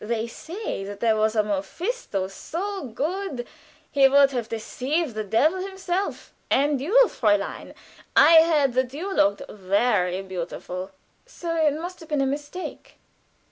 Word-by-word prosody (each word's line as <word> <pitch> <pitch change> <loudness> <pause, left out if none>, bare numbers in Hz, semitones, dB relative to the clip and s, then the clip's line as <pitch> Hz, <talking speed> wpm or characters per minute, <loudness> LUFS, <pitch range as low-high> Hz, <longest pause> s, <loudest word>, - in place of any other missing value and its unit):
They 225 +1 -1
say 330 - -6
there 205 +3 0
was 215 +1 +1
a 215 - +3
Mephisto 205 - -3
so 370 - -5
good 290 - -3 0.5
he 275 -1 +6
would 280 0 +5
have 240 -4 -3
deceived 260 +6 -2
the 215 0 -3
devil 285 - +2
himself. 380 0 -3 0.2
And 280 0 +2
you, 395 - +4
Fräulein 205 - 0 0.4
I 320 +2 +8
heard 300 -6 +2
that 255 +1 0
you 380 +6 -4
looked 200 - +2
very 195 -2 0
beautiful." 185 0 -6 0.4
"So! 335 -1 -4
It 310 -3 +2
must 355 +2 -6
have 325 - -13
been 300 -2 0
a 275 - +2
mistake." 290 +6 -6
270 Hz, 140 wpm, -24 LUFS, 215-335 Hz, 0.5 s, I